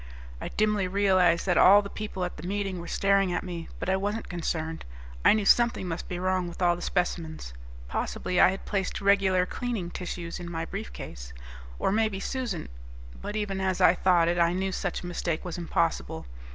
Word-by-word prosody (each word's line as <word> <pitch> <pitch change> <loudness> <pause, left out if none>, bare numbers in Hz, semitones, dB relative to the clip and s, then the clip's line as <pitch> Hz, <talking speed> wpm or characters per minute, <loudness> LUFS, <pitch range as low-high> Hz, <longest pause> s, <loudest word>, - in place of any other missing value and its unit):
I - - -3
dimly 210 -3 +1
realized 185 -3 +3
that 180 - +3
all 205 +2 +8
the - - -5
people 205 -4 -4
at 180 - -6
the 155 +3 -7
meeting 195 -2 -2
were 170 - -7
staring 195 -1 +2
at 175 - -1
me, 175 -3 -6
but - - -5
I 190 - +3
wasn't 205 +3 -2
concerned. 160 -2 -3 0.4
I - - +7
knew 215 -2 0
something 235 -4 +4
must 165 -1 -5
be 180 - -3
wrong 185 0 0
with 170 - -9
all 175 -1 +3
the 175 - -9
specimens; 165 - -2 0.3
possibly 180 - -1
I - - +8
had 190 +1 -5
placed 195 -3 -2
regular 195 -2 +3
cleaning 215 -4 -4
tissues 175 -1 -5
in 175 -1 -6
my 165 -1 -3
briefcase, 115 - -7 0.4
or - - +1
maybe 215 -2 +1
Susan... 235 -6 -3 0.5
but 205 - -5
even 200 -2 -2
as 190 -1 0
I - - +6
thought 180 -2 +3
it 175 +1 +1
I 170 0 +4
knew 190 +1 -1
such 185 -1 -3
a - - -6
mistake 170 -1 -2
was 175 0 -4
impossible. 170 - -1
185 Hz, 195 wpm, -27 LUFS, 175-200 Hz, 0.5 s, all